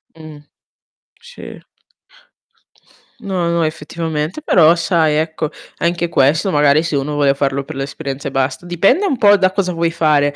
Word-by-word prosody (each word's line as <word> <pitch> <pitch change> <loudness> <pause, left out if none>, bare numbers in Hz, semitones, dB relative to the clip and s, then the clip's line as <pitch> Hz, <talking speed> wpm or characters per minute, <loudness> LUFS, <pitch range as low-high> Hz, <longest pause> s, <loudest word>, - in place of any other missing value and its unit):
Mh. 155 -2 -12 0.8
Sì. 485 +1 -11 1.6
No, 185 -5 -2
no, 170 -1 0
effettivamente, 160 - -4
però 170 - +4
sai 165 -3 +1
ecco 160 -1 -2 0.3
anche 170 0 -1
questo 160 +5 +1
magari 145 +1 +3
se 165 -3 -3
uno 140 +2 -2
vuole 140 -2 +2
farlo 140 0 -2
per 155 +3 -9
l'esperienza 135 0 -5
e - - -5
basta 135 +4 -2
dipende 195 - +2
un 270 - -1
po' 205 -2 +5
da 185 0 +2
cosa 190 -2 -1
vuoi 165 0 0
fare, 150 -3 +1
160 Hz, 150 wpm, -17 LUFS, 145-175 Hz, 1.6 s, po